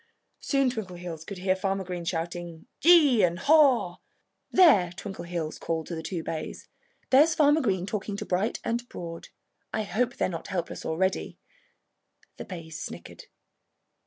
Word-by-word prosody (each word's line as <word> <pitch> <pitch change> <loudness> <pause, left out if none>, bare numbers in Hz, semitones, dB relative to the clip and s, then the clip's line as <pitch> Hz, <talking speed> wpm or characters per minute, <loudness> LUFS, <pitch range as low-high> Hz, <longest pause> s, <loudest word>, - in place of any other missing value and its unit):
Soon 275 -3 +1
Twinkleheels 180 -7 -6
could 200 +3 -8
hear 185 +1 +1
Farmer 195 0 -1
Green 180 -2 -5
shouting 170 0 -4
"Gee!" 305 -8 +6
and 175 -2 +2
"Haw!" 265 - +4 0.5
"There!" 275 - +5
Twinkleheels 170 -5 -5
called 160 -1 -2
to 170 - -5
the 160 - -5
two 165 0 -4
bays. 160 -1 -6 0.4
"There's 300 +5 +6
Farmer 300 +1 +4
Green 190 -8 0
talking 200 0 -4
to - - -5
Bright 190 +5 -1
and 240 +1 -2
Broad. 165 -1 -7 0.4
I 220 - -1
hope 240 +4 -1
they're - - 0
not 170 -3 -6
helpless 185 -4 -4
already." 190 +4 -1 1.0
The - - -7
bays 165 -4 -8
snickered. - - -9
190 Hz, 145 wpm, -27 LUFS, 170-240 Hz, 1.0 s, Gee